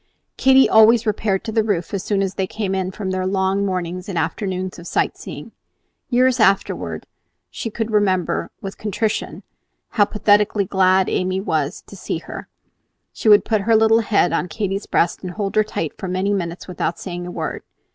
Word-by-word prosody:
Katy 265 0 +5
always 225 +1 +6
repaired 205 -2 0
to 220 - -4
the 220 0 +2
roof 195 -5 -2
as 195 - -1
soon 195 0 0
as 190 -1 -2
they 190 -1 -2
came 200 -2 -3
in 190 -1 -1
from 190 0 -4
their 185 0 -1
long 190 +1 +1
mornings 180 -1 -3
and 185 - -3
afternoons 185 +3 -3
of 170 - -10
sight - - 0
seeing. - - -9 0.6
Years 255 0 +3
afterward, 195 -3 +1 0.5
she 225 - -5
would 225 -1 -2
remember 195 -4 +1
with 195 0 -7
contrition 215 +1 -2 0.5
how 205 - +3
pathetically 205 -1 +2
glad 190 0 +3
Amy 185 0 0
always 195 - -7
was 155 +1 -1
to - - -12
see - - -4
her. - - -9 0.7
She 220 - 0
would 205 -1 +7
put 215 -3 +1
her 225 +3 +3
little 220 +1 +5
head 210 -5 +2
on - - 0
Katy's 195 +2 -3
breast 170 - +1
and 180 -1 -6
hold 200 -1 -3
her 215 - +5
tight 165 -7 -4
for 190 - -4
many 185 +3 0
minutes 175 -3 -4
without 175 -1 -2
saying 175 -1 -6
a - - -6
word. - - -4
195 Hz, 190 wpm, -20 LUFS, 185-215 Hz, 0.7 s, would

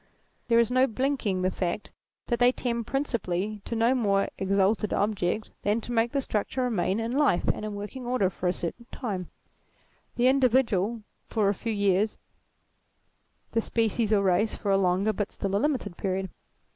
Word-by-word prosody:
There 230 -1 +4
is 235 0 +3
no 255 +1 +4
blinking 230 -6 -1
the 185 - +2
fact 180 +2 -3 0.3
that 240 -2 -1
they 245 0 +6
tend 235 -3 -3
principally 215 -7 -2
to 235 - -3
no 230 +3 +3
more 200 -6 +1
exalted 195 +2 +1
object 205 0 0
than 210 +3 +1
to 240 - -7
make 230 0 +2
the 280 - 0
structure 250 +2 -2
remain 215 -4 0
in 225 +1 -2
life 275 -8 +2
and - - -1
in 210 -1 -4
working 225 +5 -6
order 245 -7 +1
for 180 - -3
a - - +4
certain 210 +8 -5
time: 195 - -4 0.9
the 245 - +2
individual 235 -5 +2 0.2
for 210 -3 +1
a - - +2
few 225 +3 -4
years, 200 0 +1 1.3
the 230 - +1
species 225 -1 0
or 205 -2 +4
race 195 +3 +2
for 205 - -2
a - - +5
longer 190 +3 +2
but 205 0 -3
still 195 0 -3
a 200 - +2
limited 275 - -1
period. 190 -1 -2
215 Hz, 175 wpm, -27 LUFS, 195-240 Hz, 1.3 s, they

